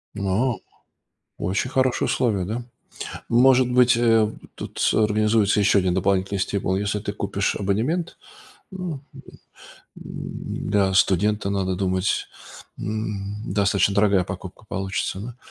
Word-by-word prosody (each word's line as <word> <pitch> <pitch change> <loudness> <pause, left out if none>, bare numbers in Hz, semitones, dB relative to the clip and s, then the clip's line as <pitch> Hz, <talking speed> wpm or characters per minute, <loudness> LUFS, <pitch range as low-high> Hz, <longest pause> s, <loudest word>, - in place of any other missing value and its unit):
А. 100 +5 +1 0.9
Очень 95 +8 -1
хорошие 130 -1 +1
условия, 105 -8 0
да? 115 +5 -3 0.7
Может 125 +1 +5
быть, 125 -1 +5
э, 115 -2 +3 0.2
тут - - -8
с - - +2
организуется 105 -1 +3
еще 100 0 +4
1 90 -1 0
дополнительный 95 +1 +1
стимул, 95 -1 -1
если 105 +1 -1
ты 100 0 -4
купишь 100 -1 -1
абонемент. 120 - -1 0.5
Ну, 180 -2 -4
м, 135 - -10 0.9
м, - - -6
для 100 -2 +2
студента, 100 +2 +2
надо 95 -2 -1
думать, 95 0 0 0.5
м, 105 -1 -4 0.2
достаточно 100 -1 +2
дорогая 100 -3 +3
покупка 95 +2 -8
получится, 95 0 -3
да? 115 +4 -7
100 Hz, 125 wpm, -23 LUFS, 95-115 Hz, 0.9 s, Может